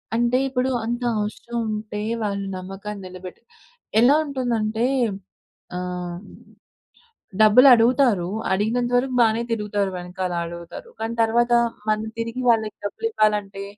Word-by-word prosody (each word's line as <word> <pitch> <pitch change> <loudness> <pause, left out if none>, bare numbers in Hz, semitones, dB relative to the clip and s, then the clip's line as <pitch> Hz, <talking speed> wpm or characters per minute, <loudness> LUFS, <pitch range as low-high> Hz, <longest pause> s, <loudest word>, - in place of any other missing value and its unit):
అంటే 240 +2 +2
ఇప్పుడు 260 0 0 0.2
అంత 240 +1 -2 0.2
అవసరం 215 +3 -4
ఉంటే 215 -1 -4 0.2
వాళ్ళు 200 -1 -2
నమ్మకాన్ని 195 +2 -7
నిలబెట్టాలి. 185 +4 -11 0.5
ఎలా 260 +5 +6
ఉంటుందంటే 235 -5 -1 0.9
ఆహ్, 180 0 -5 1.2
డబ్బులు 215 +5 +7
అడుగుతారు. 235 -5 +3 0.2
అడిగినంత 225 +5 0
వరకు 255 0 -1
బానే 225 0 +3
తిరుగుతారు. 210 -3 -1
వెనకాల 180 0 -4
అడుగుతారు. 170 - -9
కానీ 225 +1 -3
తర్వాత 235 +2 +2 0.4
మనం 215 0 0
తిరిగి 230 +2 -3
వాళ్ళకి 220 -2 +2
డబ్బులు 450 - -2
ఇవ్వాలంటే, 205 - 0
215 Hz, 115 wpm, -23 LUFS, 195-240 Hz, 1.2 s, డబ్బులు